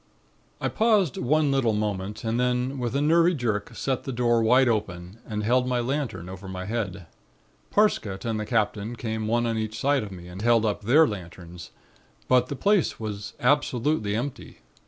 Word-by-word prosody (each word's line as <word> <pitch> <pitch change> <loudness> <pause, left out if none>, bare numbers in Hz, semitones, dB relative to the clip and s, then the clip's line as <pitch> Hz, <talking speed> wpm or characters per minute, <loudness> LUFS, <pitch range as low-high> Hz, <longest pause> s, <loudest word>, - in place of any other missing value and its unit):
"I - - -1
paused 210 - +2
one 150 +3 +2
little 130 -5 +2
moment 105 0 -3
and 115 +1 -1
then 125 +2 0
with 120 +1 -2
a 140 - +1
nervy 170 +3 +4
jerk 110 -6 -2
sent 135 -2 -1
the 135 - -5
door 120 -1 +2
wide 125 +4 +4
open 100 -3 -2
and 105 -1 -3
held 125 +3 +2
my 125 -1 0
lantern 120 - -3
over 95 +1 -9
my 95 0 -5
head. 100 -5 -3 0.6
Parsket 115 - +1
and 110 -2 -1
the 105 - -3
Captain 110 0 -1
came 110 -2 -3
one 120 +2 +1
on 115 -1 -1
each 110 0 -4
side 140 0 +2
of 105 -2 -7
me 90 -2 -10
and 90 +2 -8
held 115 0 +3
up 105 -1 -1
their 140 +10 +5
lanterns, 90 -3 -8 0.6
but 125 -1 +4
the 140 - -4
place 200 +4 +1
was 105 -2 -5
absolutely 125 -4 +1
empty. 125 - -5
115 Hz, 180 wpm, -25 LUFS, 105-130 Hz, 0.6 s, their